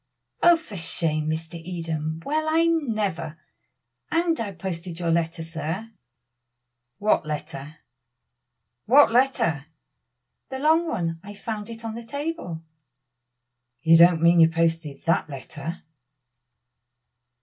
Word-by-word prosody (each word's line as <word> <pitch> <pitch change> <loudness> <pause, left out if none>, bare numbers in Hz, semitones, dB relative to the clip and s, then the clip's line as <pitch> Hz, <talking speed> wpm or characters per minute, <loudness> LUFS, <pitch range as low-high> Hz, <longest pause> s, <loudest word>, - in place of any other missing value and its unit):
"Oh! 345 0 +7
for 225 -11 -10
shame, 155 -2 -1
Mr. 160 +1 -4
Eden. 165 -2 -4
Well, 310 +2 0
I 325 +1 +3
never! 215 - -1 0.7
And 330 0 +1
I 215 -3 -3
posted 175 -2 -6
your 170 -1 0
letter, 165 0 0
sir." 165 +7 -5 1.1
"What 210 +1 +2
letter? 150 0 -6 1.1
what 275 +2 +7
letter?" 230 - +2 0.8
"The 265 - -4
long 320 +4 +3
one. 165 - -2
I 205 +1 -9
found 210 +1 -5
it 230 0 -8
on 225 - -3
the 230 - -6
table." 280 - -5 1.2
"You 165 0 +6
don't 170 0 +6
mean 170 0 +6
you 165 0 +7
posted 165 -3 -1
that 165 -1 +1
letter?" 145 +4 -7
170 Hz, 115 wpm, -25 LUFS, 165-230 Hz, 1.2 s, Oh